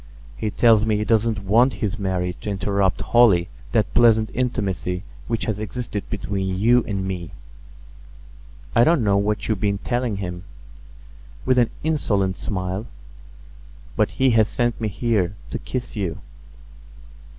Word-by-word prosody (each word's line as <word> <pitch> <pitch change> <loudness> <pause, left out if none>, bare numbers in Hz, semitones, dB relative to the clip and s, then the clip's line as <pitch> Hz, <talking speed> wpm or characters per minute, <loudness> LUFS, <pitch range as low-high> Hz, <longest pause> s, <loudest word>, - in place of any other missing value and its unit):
He 110 - -2
tells 110 +1 +4
me 110 -1 +1
he 105 - 0
doesn't 110 -2 +1
want 120 +7 +4
his 105 0 -3
marriage 90 -2 -2
to - - -4
interrupt 100 -1 0
wholly 105 -8 +4 0.2
that - - +1
pleasant 110 -2 +4
intimacy 100 -7 -2 0.2
which 115 0 -1
has 105 -2 -2
existed 110 0 -5
between 95 -3 -2
you 120 +4 +4
and 95 -2 -2
me. 90 -4 -4 1.5
I 115 - +6
don't 160 -2 +3
know 100 -1 +3
what 105 +1 -1
you've 110 -3 0
been 100 -1 +1
telling 120 +1 -2
him," 90 -2 -5 1.0
with 130 -1 +3
an 120 - +3
insolent 100 -12 0
smile, 95 +2 -3 1.1
"but - - +2
he 130 -1 +4
has 110 -2 +4
sent 120 0 -1
me 110 - 0
here 105 -3 0 0.2
to - - -3
kiss 125 -1 -5
you." 95 -6 -2
105 Hz, 145 wpm, -22 LUFS, 95-115 Hz, 1.5 s, I